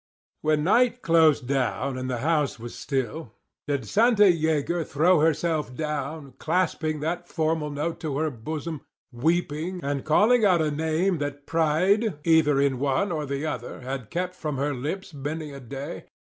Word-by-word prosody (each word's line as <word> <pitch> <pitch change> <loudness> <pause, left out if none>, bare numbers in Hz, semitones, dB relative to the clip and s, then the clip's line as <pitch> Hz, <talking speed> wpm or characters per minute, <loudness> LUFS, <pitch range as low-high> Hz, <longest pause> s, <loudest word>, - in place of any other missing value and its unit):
When 155 -1 +1
night 245 +6 +3
closed 160 -5 +4
down 135 0 0
and 130 0 -4
the 125 - -1
house 155 -4 +1
was 120 +1 -8
still, 135 -1 -3 0.3
did 140 -6 -2
Santa 225 - +4
Yeager 160 +1 0
throw 155 +5 +3
herself 155 -3 +1
down, 150 -2 -4
clasping 160 -4 0
that 175 +3 -3
formal 160 -2 -1
note 150 +4 -3
to 155 -4 -3
her 155 0 0
bosom, 150 +5 -5 0.3
weeping, 160 +6 -1
and 140 -1 -2
calling 220 +9 +4
out 185 -4 +5
a 155 -1 +1
name 160 +4 0
that 145 0 -4
pride 165 +6 +2
(either 155 -3 +4
in 140 -2 +1
one 140 +8 +1
or 155 -3 -2
the 140 +2 -3
other) 125 -4 -5
had 130 -3 -5
kept 180 +1 -2
from 155 -6 -4
her 145 +2 0
lips 155 +9 -5
many 150 +1 -5
a 140 - -8
day? 135 +3 -7
155 Hz, 160 wpm, -25 LUFS, 140-165 Hz, 0.3 s, out